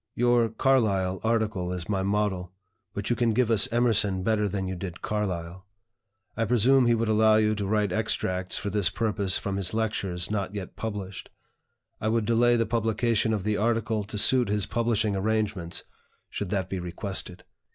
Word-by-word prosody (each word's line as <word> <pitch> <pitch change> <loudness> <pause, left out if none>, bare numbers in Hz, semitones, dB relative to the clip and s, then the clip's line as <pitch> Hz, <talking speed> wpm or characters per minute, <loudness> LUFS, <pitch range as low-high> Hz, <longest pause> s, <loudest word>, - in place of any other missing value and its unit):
Your 120 -1 +3
'Carlyle' 105 -6 +1
article 110 -5 0
is 90 -2 -4
my 100 -2 -1
model, 95 -2 -1 0.4
but 100 +3 -2
you - - +3
can 115 -1 +1
give 120 -1 +2
us 115 +3 +3
Emerson 110 -5 +2
better 105 -1 +1
than 95 0 -3
you 95 - -3
did 90 -1 -7
Carlyle. 90 -3 -3 0.7
I 115 - 0
presume 125 +3 +4
he 120 - +4
would 115 0 -1
allow 110 0 +4
you 110 0 +3
to 100 -2 -3
write 105 -1 +1
extracts 95 -3 -1
for 100 - -3
this 100 -4 +2
purpose 100 -4 +1
from 100 -1 -3
his 95 +1 0
lectures 100 -4 -2
not 100 -1 -2
yet 100 -2 -6
published. 100 -4 -6 0.7
I 110 - -2
would 110 0 +1
delay 120 +2 +3
the 115 -1 +1
publication 115 0 0
of 105 -4 -1
the 105 +1 0
article 115 -1 0
to 105 +1 -5
suit 125 +2 +4
his 105 -1 0
publishing 110 -3 0
arrangements, 100 -4 -1 0.5
should 100 - -4
that 95 -3 -1
be 95 0 -4
requested. 90 +1 -4
105 Hz, 175 wpm, -26 LUFS, 95-115 Hz, 0.7 s, presume